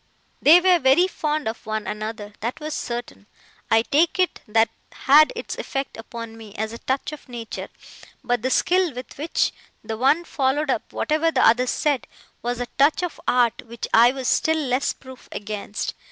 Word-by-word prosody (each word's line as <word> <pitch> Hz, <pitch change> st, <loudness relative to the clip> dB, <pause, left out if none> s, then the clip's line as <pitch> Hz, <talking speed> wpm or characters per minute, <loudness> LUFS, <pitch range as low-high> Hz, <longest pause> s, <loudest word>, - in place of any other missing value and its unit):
They 320 Hz, +5 st, +8 dB
were 360 Hz, -1 st, +4 dB
very 270 Hz, +6 st, +5 dB
fond 305 Hz, -5 st, -2 dB
of 220 Hz, -, -4 dB
one 215 Hz, -1 st, -2 dB
another: 210 Hz, 0 st, -5 dB
that 235 Hz, +6 st, -4 dB
was 305 Hz, 0 st, -5 dB
certain. 240 Hz, -5 st, -5 dB, 0.4 s
I 225 Hz, 0 st, +4 dB
take 320 Hz, +8 st, +2 dB
it, 370 Hz, -1 st, +1 dB
that 225 Hz, +1 st, +3 dB, 0.2 s
had 300 Hz, +3 st, +5 dB
its 475 Hz, -, -5 dB
effect 270 Hz, -1 st, -4 dB
upon 230 Hz, 0 st, -8 dB
me, 220 Hz, -2 st, -12 dB
as 220 Hz, +1 st, -3 dB
a 230 Hz, -, -8 dB
touch 270 Hz, +2 st, -2 dB
of 300 Hz, -3 st, -11 dB
nature; 235 Hz, -2 st, -6 dB, 0.5 s
but 245 Hz, -2 st, 0 dB
the 260 Hz, -, 0 dB
skill 355 Hz, +1 st, +2 dB
with 250 Hz, +1 st, -8 dB
which 315 Hz, +3 st, 0 dB, 0.3 s
the 220 Hz, -, -4 dB
one 275 Hz, +8 st, +3 dB
followed 280 Hz, -1 st, 0 dB
up -, -, -3 dB
whatever 315 Hz, +2 st, +1 dB
the 270 Hz, -5 st, +3 dB
other 245 Hz, +3 st, +4 dB
said, 285 Hz, -1 st, 0 dB, 0.3 s
was 240 Hz, 0 st, -2 dB
a 245 Hz, -, -1 dB
touch 295 Hz, +5 st, +4 dB
of 355 Hz, -, -4 dB
art 245 Hz, -2 st, +2 dB
which 235 Hz, 0 st, -6 dB
I 235 Hz, +2 st, +7 dB
was 260 Hz, -1 st, -4 dB
still 320 Hz, 0 st, +2 dB
less 270 Hz, -3 st, 0 dB
proof 260 Hz, -1 st, -13 dB
against. 210 Hz, 0 st, -4 dB
255 Hz, 180 wpm, -23 LUFS, 225-305 Hz, 0.5 s, They